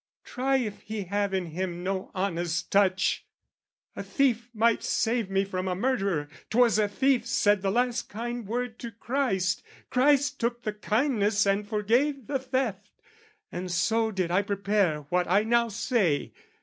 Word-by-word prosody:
"Try 270 +2 -1
if 215 -6 -3
he 215 -1 -5
have 200 +2 -1
in 190 -2 -1
him 175 +1 -4
no 190 0 -2
honest 175 -3 -2
touch! 195 -1 +2 0.7
"A - - -4
thief 245 -4 0
might 230 0 +2
save 225 -3 0
me 195 0 +1
from 185 -1 -3
a 180 - -1
murderer. 195 - 0 0.2
"'Twas 235 -2 +4
a 210 - +3
thief 255 +2 +1
said 205 -4 +3
the 195 - 0
last 245 +3 0
kind 235 0 -5
word 245 +1 -3
to 235 - -5
Christ: 225 -6 -1 0.3
"Christ 280 +2 +3
took 240 +1 -2
the 215 - -2
kindness 210 -2 +1
and 200 +1 +1
forgave 240 +6 +1
the 275 +2 -1
theft: 255 -6 -2 0.6
"And 180 +1 -5
so 220 +6 +1
did 185 -5 -2
I 185 +3 +3
prepare 200 -5 0
what 180 0 +1
I 195 +5 +3
now 235 +1 +2
say. 210 - 0
210 Hz, 160 wpm, -27 LUFS, 190-240 Hz, 0.7 s, Twas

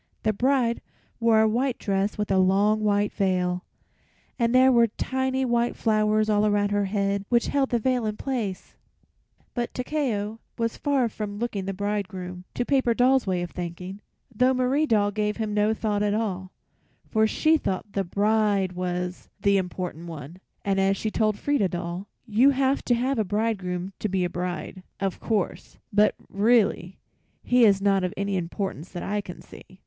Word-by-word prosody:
The 215 - +2
bride 245 +1 +1 0.4
wore 230 -2 +4
a 220 - +4
white 245 +3 0
dress 195 0 -1
and 210 -1 -2
a 190 - +4
long 200 +3 +3
white 205 0 +1
veil, 180 -2 0 0.8
and 235 +1 +2
there 260 +1 +6
were 235 -2 +5
tiny 260 +3 -1
white 240 -1 +1
flowers 215 -1 +2
all 210 -1 +2
around 205 -1 +2
her 205 0 +1
head 200 0 0
which 235 -1 +2
held 275 -2 +1
the 240 - +2
veil 245 0 0
in 210 0 -3
place. 225 -9 -4 0.8
But 240 -1 -3
Takeo 235 -6 -2 0.2
was 230 0 -1
far 275 -4 +1
from 210 -2 -5
looking 210 -4 -3
the 195 - -3
bridegroom, 190 -3 -4
to 245 - -1
Paper 260 -4 +2
Doll's 255 -1 +3
way 180 -2 0
of 175 - -6
thinking, 180 +3 -6 0.3
though 255 +4 +3
Marie 260 +5 +1
Doll 205 -4 +2
gave 210 0 -1
him 215 -2 -2
no 210 +1 +2
thought 210 -2 -1
at 210 0 +1
all, 190 -4 -3 0.6
for 220 -1 +2
she 315 +8 +3
thought 195 - -2
the 195 - 0
bride 205 0 +1
was 180 0 -4
the 200 0 +3
important 180 -2 -4
one, 160 0 -8 0.3
and 195 -1 +1
as 195 0 +2
she 220 - -2
told 215 -2 +1
Frieda 285 -9 +1
Doll, 175 +3 -5 0.2
"You 240 +4 +4
have 275 0 +1
to 245 - +3
have 255 +1 0
a - - +3
bridegroom 195 -3 -2
to 215 - -2
be 190 -1 0
a 175 - -3
bride, 180 +1 -4 0.2
of 195 -2 -2
course; 215 -5 -2 0.2
but 210 +1 +4
really 200 -3 +2 0.5
he 245 -1 +5
is 195 -2 +4
not 195 -2 +3
of 180 +3 -2
any 200 0 -1
importance 180 -1 -4
that 175 - -5
I 205 +1 -1
can 180 -3 -10
see." 185 - -15
210 Hz, 180 wpm, -25 LUFS, 190-235 Hz, 0.8 s, there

